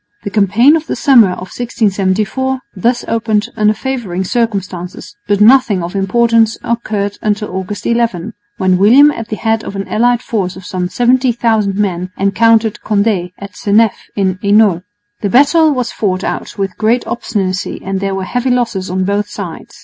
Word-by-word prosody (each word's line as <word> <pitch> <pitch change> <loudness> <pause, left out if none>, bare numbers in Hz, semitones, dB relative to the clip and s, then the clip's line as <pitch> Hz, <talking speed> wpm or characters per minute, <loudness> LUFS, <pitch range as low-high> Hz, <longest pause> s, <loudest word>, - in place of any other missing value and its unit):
The 200 - -5
campaign 215 - +4
of 320 0 -3
the - - -2
summer 235 -9 +4
of 185 +1 -9
1674 220 +3 -1 0.2
thus 240 +6 0
opened 220 -2 0
under 215 -1 +2
favouring 225 -10 -3
circumstances, 190 -5 -3
but 205 -1 +1
nothing 220 -4 +4
of 175 +3 -6
importance 225 +3 +2
occurred 210 -4 -2
until 210 -2 -2
August 190 +2 -5
11, 230 -4 -1 0.2
when 185 -2 +1
William 260 +9 +6
at 230 -6 -6
the 215 - -4
head 225 0 -1
of 200 - -7
an 195 0 -4
allied 240 +2 +1
force 195 -5 -2
of 190 -1 -11
some 180 -1 -3
70,000 235 -4 +1
men 185 -3 -2
encountered 220 +2 +2
Condé 200 -4 0
at 200 0 -10
Seneff 215 +1 +2 0.2
in 190 -2 -1
Hainault. 200 -4 +3 0.4
The 200 - -1
battle 300 - +4
was 250 -4 -2
fought 190 -3 -2
out - - -4
with 195 -2 -4
great 230 +3 +1
obstinacy 195 -6 -3
and 195 0 -2
there 195 0 -2
were 190 - -3
heavy 245 +6 -2
losses 235 -7 -1
on 185 +1 -1
both 205 +2 -1
sides. 180 -6 -8
210 Hz, 165 wpm, -14 LUFS, 190-235 Hz, 0.4 s, William